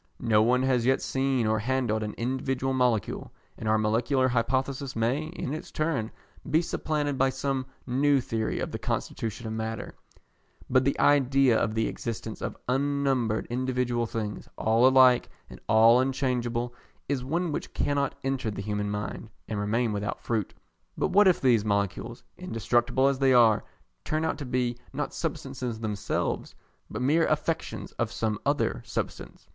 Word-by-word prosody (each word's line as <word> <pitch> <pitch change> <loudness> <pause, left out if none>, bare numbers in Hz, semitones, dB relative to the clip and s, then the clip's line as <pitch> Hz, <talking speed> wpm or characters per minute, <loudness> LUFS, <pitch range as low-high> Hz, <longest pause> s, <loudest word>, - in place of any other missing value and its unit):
No 110 -2 +3
one 125 +3 +3
has 130 -1 +3
as - - -3
yet 130 - +4
seen 130 -3 0
or 110 0 +2
handled 120 -2 0
an 105 -1 -4
individual 130 +2 -1
molecule, 125 -6 0 0.2
and 110 - -4
our 110 - +4
molecular 125 +5 +2
hypothesis 130 +2 -1
may, 120 +7 0
in 155 -4 -5
its 155 - -6
turn, 155 -8 -1 0.4
be 155 +3 +4
supplanted 150 -4 -2
by 135 0 +4
some 135 -1 -2 0.2
new 140 +3 +3
theory 115 -3 -2
of - - -3
the - - -4
constitution 115 +1 -3
of 110 - -3
matter; 110 0 -4 0.7
but 130 0 +3
the 140 - +1
idea 135 -3 +4
of 110 0 0
the 110 0 +1
existence 110 -1 -5
of - - -4
unnumbered 135 -4 +1
individual 125 -1 0
things, 105 -2 -5
all 115 +3 +4
alike 130 -2 +5 0.2
and - - -11
all 115 +2 +7
unchangeable, 125 -2 -1 0.3
is 135 -3 -1
one 165 +5 -1
which - - -4
cannot 140 -1 0
enter 135 -3 -1
the 100 -1 -5
human 105 0 -2
mind 105 +2 -4 0.2
and 105 -2 -3
remain 110 +2 0
without 105 0 -3
fruit. 110 -4 -2 0.5
But - - +1
what 205 +1 +5
if 185 - +4
these 120 -5 +3
molecules, 100 +3 -2 0.2
indestructible 125 -4 +1
as 140 -1 +1
they 135 -1 +4
are, 115 -3 +5 0.4
turn 155 +1 -1
out 160 - -1
to 145 - -5
be 125 -1 -1
not - - -3
substances 120 -3 -4
themselves, 105 -2 -2 0.3
but - - -4
mere 155 +5 +3
affections 155 +2 -2
of 120 -2 0
some 110 -2 -1
other - - +1
substance? - - -5
125 Hz, 160 wpm, -27 LUFS, 110-135 Hz, 0.7 s, all